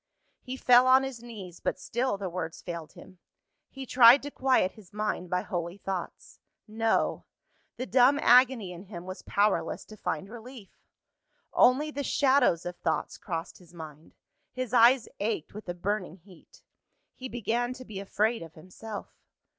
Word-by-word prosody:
He 260 0 -6
fell 250 0 +5
on 260 +1 +6
his 265 -3 -6
knees; 200 -8 -10
but - - -2
still 240 -2 -1
the 195 -1 -4
words 170 -2 -5
failed 170 -3 -7
him. 185 -2 -15 0.5
He 270 -1 -8
tried 250 +2 +7
to 290 - -6
quiet 255 -9 +2
his 205 -5 -17
mind 210 -4 -3
by 180 +1 0
holy 175 +1 -4
thoughts. 190 -3 -6 0.3
No! 225 +1 0 0.5
The 255 - -3
dumb 260 +2 +4
agony 245 -6 +4
in 180 +2 -10
him 180 -3 -9
was 185 +1 -7
powerless 205 0 0
to 215 - -12
find 195 -1 -4
relief. 235 -1 -11 0.8
Only 290 +5 +4
the 285 -1 -4
shadows 265 - +2
of 175 0 -5
thoughts 160 - -2
crossed 165 -5 -5
his 175 -1 -19
mind; 155 -1 -11 0.4
his 255 -2 -5
eyes 245 +1 +5
ached 205 -6 -2
with 210 -2 -9
a 175 - -3
burning 190 -1 -3
heat. 180 -1 -20 0.5
He 260 0 -8
began 240 +1 -1
to 255 0 -11
be 205 -4 -7
afraid 215 +3 0
of 165 -1 -11
himself. 200 +6 -9
215 Hz, 160 wpm, -28 LUFS, 180-250 Hz, 0.8 s, tried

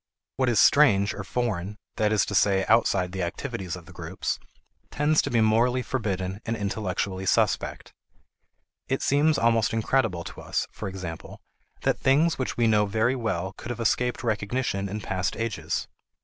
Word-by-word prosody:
What 130 -1 +2
is 120 - +1
strange 100 - +5
or 100 - -6
foreign 105 -2 -2 0.2
(that 105 0 +2
is 105 -3 +3
to - - -5
say 95 -1 +3
outside 100 -5 +3
the 95 0 -4
activities 95 0 -4
of 90 -2 -11
the - - -14
groups) - - -4 0.5
tends 150 +1 +2
to - - -3
be 115 -2 +2
morally 120 +4 +3
forbidden 100 -6 -3
and 115 0 -2
intellectually 95 -2 -2
suspect. - - 0 0.9
It 135 +1 -1
seems 145 +2 +3
almost 115 -1 +2
incredible 110 -6 +1
to - - -9
us, - - -1
for 105 - -6
example, 90 -4 -7 0.4
that - - +1
things 150 +5 +3
which 130 - -2
we 120 - +3
know 105 -2 +3
very 110 +5 +1
well 95 -7 -2
could - - -8
have 120 -1 -4
escaped 125 +2 0
recognition 105 -2 -1
in 105 +2 -4
past 95 -1 -2
ages. 115 -3 -2
110 Hz, 165 wpm, -26 LUFS, 95-120 Hz, 0.9 s, strange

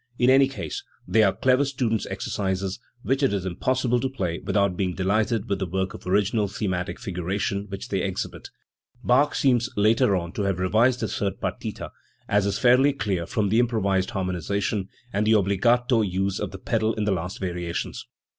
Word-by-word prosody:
In 125 +1 +4
any 135 0 +6
case 135 - -5 0.2
they 105 +5 +4
are 100 -3 +5
clever 130 +5 +2
student's 120 -6 -1
exercises, 95 0 -2 0.2
which 135 +2 0
it 135 - +3
is 95 -2 -2
impossible 125 +6 0
to 130 +2 -1
play 90 -10 -3
without 100 -3 +1
being 90 -1 -1
delighted 105 +4 0
with 100 -1 -1
the 95 - -2
power 95 +2 0
of - - -10
original 100 +2 +2
thematic 95 -2 -3
figuration 100 -1 -2
which 100 0 -6
they 95 -2 0
exhibit. 95 -1 -4 0.5
Bach 140 +4 +3
seems 125 -3 +2
later 105 -1 +4
on 85 -2 -3
to 105 - -4
have 100 -2 0
revised 110 +7 +2
the 110 - 0
third 100 -2 -2
partita, - - -4 0.4
as 100 0 +2
is 100 0 0
fairly 130 +2 +5
clear 100 -8 -2
from 105 -3 0
the 110 +4 +3
improved 100 -6 +1
harmonisation 95 +2 -2 0.3
and 105 +2 +1
the 110 - +5
obbligato 115 +5 +3
use 95 -1 -1
of - - -2
the 95 - -8
pedal 110 +3 0
in 110 - -1
the 105 - +1
last 90 +1 -4
variations. 90 -2 -4
100 Hz, 185 wpm, -25 LUFS, 95-120 Hz, 0.5 s, any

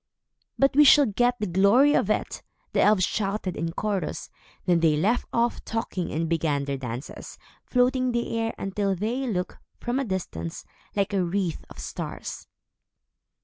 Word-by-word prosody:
"But 275 0 +3
we 295 - +8
shall 290 0 +7
get 245 +3 +1
the 210 - -1
glory 200 +10 +4
of - - +2
it," - - -1 0.3
the - - +3
elves 205 -3 +4
shouted 195 -3 -2
in 165 0 -2
chorus. 200 -4 -3 0.3
Then 175 -2 +3
they 160 -2 +3
left 215 +10 +1
off 235 0 0
talking 220 -6 -3
and 165 +2 -1
began 155 -4 0
their 140 -1 -2
dances, 125 +2 -7 0.3
floating 255 +1 +2
in 250 - +1
the 235 -1 -1
air, 225 0 -1
until 195 0 -1
they 235 +8 -2
looked, 180 -5 -3 0.2
from 245 +2 -1
a - - 0
distance, 175 - -4 0.3
like 200 0 0
a 190 -2 +2
wreath 175 -1 -2
of - - -13
stars. - - -6
200 Hz, 165 wpm, -26 LUFS, 170-240 Hz, 0.3 s, we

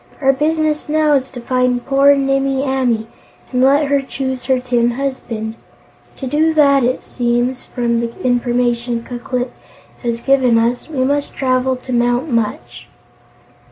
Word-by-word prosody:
"Our 270 -1 +3
business 305 +1 0
now 305 0 +3
is 270 -2 +1
to 250 - -9
find 250 0 0
poor 275 +1 +5
Nimmie 270 0 0
Amee 255 -5 0 0.5
and 250 - +1
let 280 +3 +4
her 280 0 +1
choose 265 -1 -4
her 260 -1 +2
tin 240 -1 +1
husband. 235 -4 -4 0.6
To 270 - -5
do 315 +4 +1
that, 280 -3 +4
it 250 +2 0
seems, 245 +1 -1
from 235 -2 -1
the 235 0 -5
information 240 -1 0
Ku 245 0 -7
Klip 250 0 -3 0.5
has 235 -2 -2
given 255 -2 +3
us, 235 +5 0
we 270 -5 -1
must 285 +2 -1
travel 255 0 +1
to 255 0 -7
Mount 245 +4 +1
Munch." 230 -3 -3
255 Hz, 155 wpm, -17 LUFS, 240-275 Hz, 0.6 s, poor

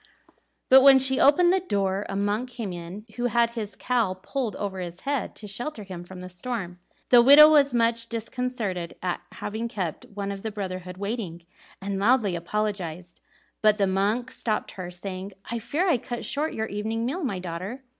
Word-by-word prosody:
But 265 +1 +8
when 270 0 +8
she 265 0 +2
opened 345 +6 +5
the 380 - +3
door, 200 - -1
a 195 - -3
monk 205 +5 -1
came 230 -6 -5
in 175 +5 -8
who 245 - -1
had 235 -1 +2
his 220 -3 -5
cowl 235 -7 0
pulled 235 +4 -3
over 195 -2 -4
his 175 -1 -6
head 280 -5 -2
to 215 - -10
shelter 215 +4 -5
him 185 -3 -8
from 180 +1 -10
the 185 - -7
storm. 185 -2 -4 0.3
The 245 -1 +8
widow 285 +5 +10
was 290 -3 +5
much 230 -1 +1
disconcerted 230 -6 -3
at 180 -1 -1
having 220 +3 -4
kept 185 -8 -4
one 200 -1 -5
of 195 -1 -6
the 220 - -3
brotherhood 185 -3 -5
waiting, 200 -5 -4 0.3
and 195 0 -3
loudly 210 -3 +3
apologized, 180 -2 -3 0.4
but 215 -1 +4
the 200 - +3
monk 205 +6 0
stopped 215 -2 -2
her, 185 -2 -7
saying, 185 +2 -7 0.2
"I 235 - -1
fear 320 - -1
I 280 -9 +3
cut 240 +1 -5
short 300 +3 -1
your 220 - -1
evening 220 +2 -3
meal, 320 +9 -2
my 215 -9 -1
daughter." 185 +8 -6
210 Hz, 185 wpm, -26 LUFS, 190-245 Hz, 0.4 s, widow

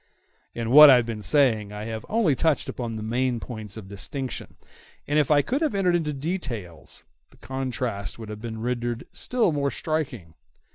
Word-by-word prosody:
In 115 0 -2
what 150 +2 +11
I 135 - +9
have 120 -2 +2
been 115 -2 -5
saying 110 -6 +2
I 105 0 -6
have 110 -1 -6
only 215 -9 +3
touched 160 +1 +1
upon 120 -3 -4
the 110 - -5
main 120 +2 0
points 110 -4 -7
of 105 -4 -8
distinction; 130 +6 -5 0.5
and 150 +1 +2
if 145 - +1
I 145 -1 +5
could 270 +5 -1
have 305 -9 0
entered 180 -3 +2
into 160 -3 0
details, 135 - -5 0.3
the - - -22
contrast 125 -5 -3
would 110 -2 -8
have 105 0 -7
been 110 -1 -6
rendered 120 -1 -2
still 245 -7 +1
more 140 -2 0
striking. 135 - -3
125 Hz, 185 wpm, -25 LUFS, 110-150 Hz, 0.5 s, what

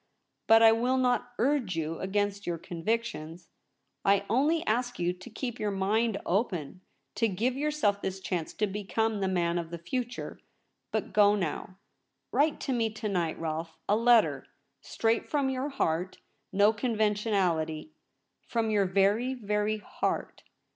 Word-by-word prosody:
But 225 0 +7
I 225 - +9
will 245 +3 +2
not 245 -1 +1
urge 250 - +1
you 165 0 -3
against 205 +1 -1
your 170 -1 -1
convictions. 175 -1 -4 0.5
I 200 0 +3
only 300 +7 +2
ask 245 +2 0
you 175 0 0
to 185 +6 -12
keep 240 +1 -5
your 210 - 0
mind 205 +3 +1
open 185 - -1 0.2
— - - -49
to 230 - +3
give 225 +6 -1
yourself 280 -8 0
this 190 0 -3
chance 175 -4 -3
to 210 - +1
become 210 +2 -1
the 195 - 0
man 175 -2 +1
of 165 -1 -5
the 170 - -5
future. 245 +9 -4 0.5
But - - -2
go 205 -1 +5
now. 185 0 -3 0.5
Write 295 +2 +2
to 270 - -1
me 230 -2 +1
to 220 0 -4
night, 175 -5 -1
Rolfe 160 0 -4
— - - -48
a 205 - +4
letter 230 0 +4 0.3
straight 225 0 0
from 280 -3 +1
your 265 +2 -2
heart 180 - -1 0.2
— - - -48
no 205 +2 +4
conventionality! 205 - 0 0.6
From 225 -2 0
your 200 -2 +3
very, 200 +7 +2
very 210 -2 -1
heart.' 210 - -3
210 Hz, 160 wpm, -29 LUFS, 185-235 Hz, 0.6 s, I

